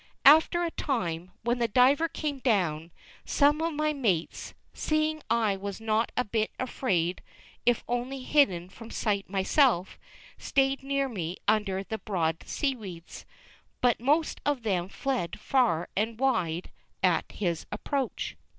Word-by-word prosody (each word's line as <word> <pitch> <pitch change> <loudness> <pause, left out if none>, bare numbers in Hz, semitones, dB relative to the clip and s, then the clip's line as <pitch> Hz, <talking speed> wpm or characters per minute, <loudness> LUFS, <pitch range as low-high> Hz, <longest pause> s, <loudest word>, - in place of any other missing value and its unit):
After 320 +4 +7
a 335 - -1
time, 180 - -2
when 240 +2 0
the 235 - +2
diver 260 +8 +4
came 295 -3 -3
down, 175 - +1 0.3
some 295 +2 +3
of 330 +1 0
my 305 0 0
mates, 205 - -1 0.2
seeing 310 0 0
I 220 -4 +2
was 200 +1 -6
not 220 +1 0
a 250 - +3
bit 215 0 0
afraid 185 -9 -1 0.5
if 240 -2 +3
only 250 +2 -3
hidden 195 - +3
from 225 +3 -12
sight 200 -4 -1
myself, 195 - +2 0.4
stayed 270 0 +1
near 275 0 0
me 180 -7 -4
under 205 -3 +1
the 220 +2 -5
broad 165 -6 -1
seaweeds, 210 - -4 0.5
but 245 -2 +2
most 295 +6 +1
of 285 -5 0
them 185 -4 0
fled 250 -7 -2
far 220 -11 +2
and 225 +3 -1
wide 185 -11 0 0.3
at - - +2
his 170 -5 -2
approach. 260 +5 -3
230 Hz, 140 wpm, -28 LUFS, 190-275 Hz, 0.5 s, After